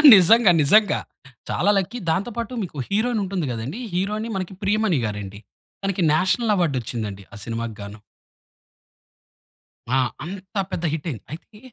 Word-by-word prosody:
నిజంగా. 200 Hz, +2 st, +6 dB
నిజంగా. 205 Hz, +9 st, +4 dB, 0.5 s
చాలా 200 Hz, -, +1 dB
లక్కీ 195 Hz, +6 st, -1 dB
దాంతో 195 Hz, +8 st, -1 dB
పాటు 235 Hz, +2 st, -3 dB
మీకు 170 Hz, -5 st, -8 dB
హీరోయిన్ 220 Hz, +2 st, +1 dB
ఉంటుంది 185 Hz, -4 st, -2 dB
కదండీ. 120 Hz, -, -4 dB
హీరోయిన్ 195 Hz, 0 st, -2 dB
ప్రియమణిగారండీ 115 Hz, -, 0 dB, 0.4 s
తనకి 195 Hz, -1 st, -1 dB
నేషనల్ 190 Hz, +7 st, +2 dB
అవార్డ్ 170 Hz, -7 st, +1 dB
వచ్చింది 115 Hz, -1 st, -4 dB
అండి 100 Hz, 0 st, -10 dB
ఆ -, -, -8 dB
సినిమాకిగాను. 110 Hz, -3 st, -5 dB, 1.9 s
ఆ! 130 Hz, -, +3 dB, 0.3 s
అంత 190 Hz, +3 st, -8 dB, 0.2 s
పెద్ద 170 Hz, -, -3 dB
హిట్ 160 Hz, +1 st, -4 dB
అయింది. 115 Hz, -9 st, -6 dB
అయితే 210 Hz, +6 st, -11 dB
185 Hz, 130 wpm, -23 LUFS, -, 1.9 s, నిజంగా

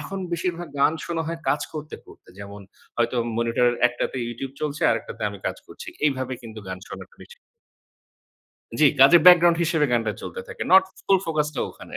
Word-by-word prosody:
এখন 195 Hz, -, -6 dB
বেশিরভাগ 175 Hz, 0 st, -3 dB
গান 145 Hz, -, +4 dB
শোনা 165 Hz, -1 st, -3 dB
হয় 165 Hz, 0 st, -4 dB
কাজ 145 Hz, -, +1 dB
করতে, 155 Hz, -1 st, -7 dB
করতে। -, -, -18 dB
যেমন 100 Hz, 0 st, -9 dB, 0.4 s
হয়তো 120 Hz, +1 st, 0 dB, 0.2 s
মনিটর 115 Hz, +1 st, +2 dB, 0.2 s
একটাতে 120 Hz, +2 st, -4 dB
YouTube 130 Hz, +3 st, -7 dB
চলছে 150 Hz, 0 st, -3 dB
আরেকটাতে -, -, -4 dB
আমি 100 Hz, -, -9 dB
কাজ -, -, -3 dB
করছি। -, -, -11 dB, 0.2 s
এইভাবে 130 Hz, -3 st, -1 dB
কিন্তু 110 Hz, -1 st, -10 dB
গান 95 Hz, 0 st, -5 dB
শোনাটা 485 Hz, -, -10 dB
বেশি 480 Hz, -, -16 dB, 1.4 s
জি, 155 Hz, -, +6 dB, 0.2 s
কাজের 155 Hz, +5 st, +8 dB
ব্যাকগ্রাউন্ড 175 Hz, -1 st, +7 dB
হিসেবে 160 Hz, -3 st, +1 dB
গানটা 115 Hz, -3 st, 0 dB
চলতে 475 Hz, -, -6 dB
থাকে। -, -, -7 dB
নট 190 Hz, 0 st, +9 dB, 0.2 s
ফুল 195 Hz, -, +4 dB
ফোকাস 155 Hz, -2 st, -1 dB
টা -, -, -3 dB
ওখানে। -, -, -10 dB
150 Hz, 175 wpm, -23 LUFS, 120-170 Hz, 1.4 s, নট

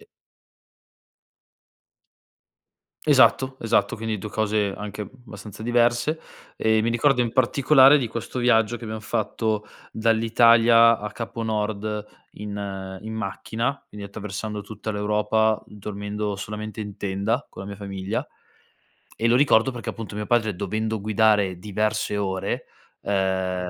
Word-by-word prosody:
E 435 Hz, -, -19 dB, 3.0 s
Esatto, 130 Hz, -1 st, +4 dB
esatto, 115 Hz, -1 st, +1 dB
quindi 110 Hz, -1 st, -3 dB
2 105 Hz, +2 st, -6 dB
cose 105 Hz, -2 st, 0 dB
anche 105 Hz, 0 st, -5 dB
abbastanza 110 Hz, -5 st, -11 dB
diverse, 120 Hz, +6 st, +1 dB, 0.3 s
ehm, 110 Hz, 0 st, +2 dB
mi 115 Hz, -, +1 dB
ricordo 125 Hz, +3 st, +2 dB
in 120 Hz, -1 st, 0 dB
particolare 135 Hz, +3 st, +6 dB
di 125 Hz, -, -1 dB
questo 115 Hz, +3 st, -5 dB
viaggio 120 Hz, -1 st, +3 dB
che 115 Hz, -, -9 dB
abbiam 110 Hz, 0 st, -5 dB
fatto 110 Hz, -1 st, -1 dB, 0.3 s
dall'Italia 115 Hz, +1 st, +5 dB
a 105 Hz, 0 st, -6 dB
Capo 115 Hz, 0 st, -5 dB
Nord, 105 Hz, -1 st, -2 dB, 0.3 s
in 100 Hz, -2 st, -6 dB
in 110 Hz, +1 st, -6 dB
macchina, 110 Hz, +5 st, -3 dB
quindi 105 Hz, -1 st, -8 dB
attraversando 105 Hz, +1 st, -5 dB
tutta 110 Hz, +1 st, -6 dB
l'Europa, 105 Hz, +1 st, +1 dB
dormendo 105 Hz, 0 st, -5 dB
solamente 105 Hz, +2 st, -6 dB
in 105 Hz, -2 st, -6 dB
tenda 100 Hz, +6 st, -1 dB
con -, -, -9 dB
la 95 Hz, -, -8 dB
mia 100 Hz, -, -7 dB
famiglia. 100 Hz, +1 st, -4 dB, 0.9 s
E 115 Hz, -, +1 dB
lo 120 Hz, -, +4 dB
ricordo 135 Hz, -2 st, +4 dB
perché, 120 Hz, -2 st, -6 dB
appunto, 110 Hz, -2 st, -7 dB
mio 105 Hz, 0 st, -3 dB
padre 110 Hz, -4 st, +1 dB
dovendo 110 Hz, +2 st, -2 dB
guidare 105 Hz, -3 st, +2 dB
diverse 105 Hz, +2 st, -1 dB
ore, 95 Hz, -2 st, -2 dB, 0.4 s
ehm, 95 Hz, -2 st, -1 dB
110 Hz, 130 wpm, -24 LUFS, 105-115 Hz, 3.0 s, particolare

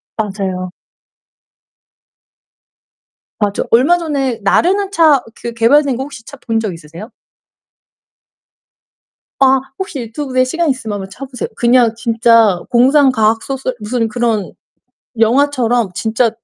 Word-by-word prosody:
맞아요. 190 Hz, -4 st, -3 dB, 2.7 s
아 205 Hz, -1 st, +1 dB
저 -, -, -2 dB
얼마 275 Hz, +10 st, +4 dB
전에 270 Hz, -7 st, -2 dB
나르는 380 Hz, -, +2 dB
차 310 Hz, -8 st, +4 dB
그 235 Hz, -, -7 dB
개발된 265 Hz, +4 st, +3 dB
거 265 Hz, -, -4 dB
혹시 275 Hz, -5 st, -10 dB
차 280 Hz, -, -11 dB
본 225 Hz, 0 st, +1 dB
적 210 Hz, -5 st, -3 dB
있으세요? 165 Hz, -, -11 dB, 2.3 s
아 265 Hz, 0 st, +4 dB, 0.2 s
혹시 380 Hz, -8 st, -5 dB
유튜브에 255 Hz, +2 st, -2 dB
시간 330 Hz, +6 st, -1 dB
있으면 225 Hz, -6 st, -3 dB
한번 195 Hz, -1 st, -6 dB
쳐 275 Hz, +6 st, -8 dB
보세요. 250 Hz, -3 st, -5 dB
그냥 240 Hz, -1 st, +3 dB
진짜 230 Hz, -4 st, +3 dB
공상 265 Hz, +3 st, +4 dB
과학 225 Hz, -1 st, +1 dB
소설 265 Hz, -2 st, -4 dB
무슨 225 Hz, +2 st, -2 dB
그런 220 Hz, -3 st, -1 dB, 0.7 s
영화처럼 240 Hz, -2 st, +2 dB
진짜 225 Hz, +4 st, 0 dB
240 Hz, 235 characters per minute, -15 LUFS, 220-270 Hz, 2.7 s, 얼마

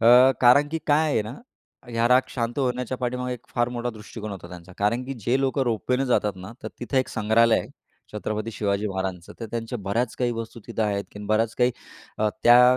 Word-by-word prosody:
अ, 125 Hz, +3 st, +7 dB
कारण 140 Hz, +4 st, +6 dB
की 165 Hz, +1 st, -2 dB
काय 155 Hz, +1 st, +3 dB
आहे 110 Hz, -, +2 dB
ना, 110 Hz, +5 st, -7 dB, 0.5 s
ह्या 115 Hz, 0 st, +1 dB
राग 125 Hz, +1 st, +6 dB
शांत 120 Hz, +2 st, -3 dB
होण्याच्या 125 Hz, -1 st, -1 dB
पाठीमागे 125 Hz, 0 st, -2 dB
एक 120 Hz, -, -14 dB
फार 120 Hz, 0 st, +2 dB
मोठा 120 Hz, 0 st, -3 dB
दृष्टिकोन 110 Hz, 0 st, -8 dB
होता 95 Hz, -3 st, -8 dB
त्यांचा. 90 Hz, +1 st, -11 dB
कारण 115 Hz, +5 st, +1 dB
की 135 Hz, +1 st, -5 dB
जे 130 Hz, +3 st, +2 dB
लोकं 135 Hz, 0 st, +1 dB
रोपवेने 125 Hz, +3 st, 0 dB
जातात 105 Hz, -4 st, +2 dB
ना, 95 Hz, +5 st, -9 dB
तर -, -, -4 dB
तिथं 130 Hz, +3 st, -3 dB
एक 130 Hz, -, 0 dB
संग्रहालय 115 Hz, +1 st, +3 dB
आहे, -, -, -9 dB, 0.4 s
छत्रपती 110 Hz, +1 st, -3 dB
शिवाजी 100 Hz, 0 st, 0 dB
महाराजांचं. 95 Hz, -2 st, -4 dB
तर 115 Hz, -, -4 dB
त्यांच्या 115 Hz, +1 st, -3 dB
बऱ्याच 110 Hz, +5 st, -1 dB
काही 125 Hz, -1 st, +1 dB
वस्तु 115 Hz, 0 st, -6 dB
तिथं 115 Hz, -1 st, -2 dB
आहेत, 100 Hz, -1 st, -1 dB
की -, -, -10 dB
बऱ्याच 110 Hz, +1 st, +1 dB
काही 125 Hz, 0 st, +4 dB, 0.5 s
अ, 110 Hz, -, +3 dB
त्या 125 Hz, +1 st, +7 dB
115 Hz, 205 wpm, -25 LUFS, 105-125 Hz, 0.5 s, अ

